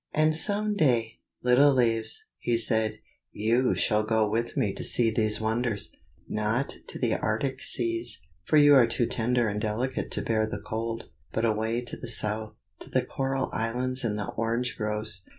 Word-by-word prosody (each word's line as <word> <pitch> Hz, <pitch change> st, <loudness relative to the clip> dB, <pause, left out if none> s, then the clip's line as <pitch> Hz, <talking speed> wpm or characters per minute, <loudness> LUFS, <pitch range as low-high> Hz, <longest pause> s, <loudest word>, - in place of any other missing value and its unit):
"And 155 Hz, 0 st, +3 dB
some 210 Hz, +4 st, +4 dB
day, 120 Hz, -, +1 dB, 0.2 s
little 125 Hz, +4 st, +5 dB
leaves," 115 Hz, -3 st, +1 dB
he 120 Hz, -1 st, 0 dB
said, 110 Hz, -2 st, +3 dB, 0.3 s
"you 115 Hz, +4 st, +1 dB
shall 105 Hz, -1 st, +1 dB
go 110 Hz, 0 st, +1 dB
with 115 Hz, +3 st, -2 dB
me 100 Hz, -3 st, +1 dB
to -, -, -4 dB
see 115 Hz, -2 st, +2 dB
these 110 Hz, -1 st, 0 dB
wonders; 110 Hz, -1 st, -1 dB, 0.3 s
not 110 Hz, +5 st, -1 dB
to -, -, -5 dB
the -, -, 0 dB
arctic 130 Hz, +5 st, -2 dB
seas, 115 Hz, -6 st, +1 dB, 0.2 s
for 155 Hz, -, +3 dB
you 145 Hz, -1 st, +7 dB
are 130 Hz, -4 st, +6 dB
too 120 Hz, +1 st, +1 dB
tender 120 Hz, +1 st, 0 dB
and 105 Hz, 0 st, -3 dB
delicate 120 Hz, +4 st, -2 dB
to -, -, -2 dB
bear 110 Hz, -1 st, 0 dB
the -, -, -5 dB
cold; 115 Hz, +1 st, -5 dB, 0.2 s
but 115 Hz, -, -1 dB
away 110 Hz, +2 st, 0 dB
to 120 Hz, -, -5 dB
the 125 Hz, -, -8 dB
south, 110 Hz, -1 st, -1 dB, 0.2 s
to -, -, -10 dB
the -, -, 0 dB
coral 135 Hz, 0 st, -2 dB
islands 125 Hz, +3 st, -1 dB
and 105 Hz, -3 st, -1 dB
the 105 Hz, -, -4 dB
orange 115 Hz, +2 st, -2 dB
groves. 105 Hz, -3 st, -3 dB
115 Hz, 175 wpm, -27 LUFS, 110-125 Hz, 0.3 s, you